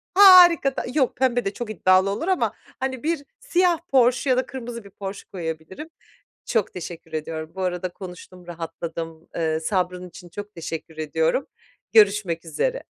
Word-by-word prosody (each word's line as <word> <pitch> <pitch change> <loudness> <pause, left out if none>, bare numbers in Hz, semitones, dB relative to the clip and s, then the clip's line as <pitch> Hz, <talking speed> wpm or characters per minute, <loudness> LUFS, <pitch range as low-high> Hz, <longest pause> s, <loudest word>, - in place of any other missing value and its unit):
harika. 355 -8 +8
Da - - -1
yok 270 -5 +1
pembe 245 -3 +1
de 195 - -1
çok 240 -2 -6
iddialı 185 -1 +3
olur 210 - -3
ama, 375 -1 +1 0.3
hani, 260 -1 -3
bir 320 -2 -1 0.2
siyah 360 -8 +2
Porsche 255 0 +3
ya 255 - +4
da 260 - +1
kırmızı 240 -3 -7
bir 200 - -13
Porsche 195 0 -8
koyabilirim. 165 - -6 0.6
Çok 220 -5 0
teşekkür 170 -2 -8
ediyorum 155 0 -4
bu 190 - -5
arada 180 0 -1
konuştum 180 -1 -11
rahatladım. 165 -1 -6
Iıı, 160 -1 0
sabrın 180 0 -1
için 175 0 -13
çok 205 +3 -8
teşekkür 160 -1 -6
ediyorum. 160 - 0 0.5
Görüşmek 200 -6 +4
üzere. - - -1
195 Hz, 155 wpm, -23 LUFS, 165-260 Hz, 0.6 s, harika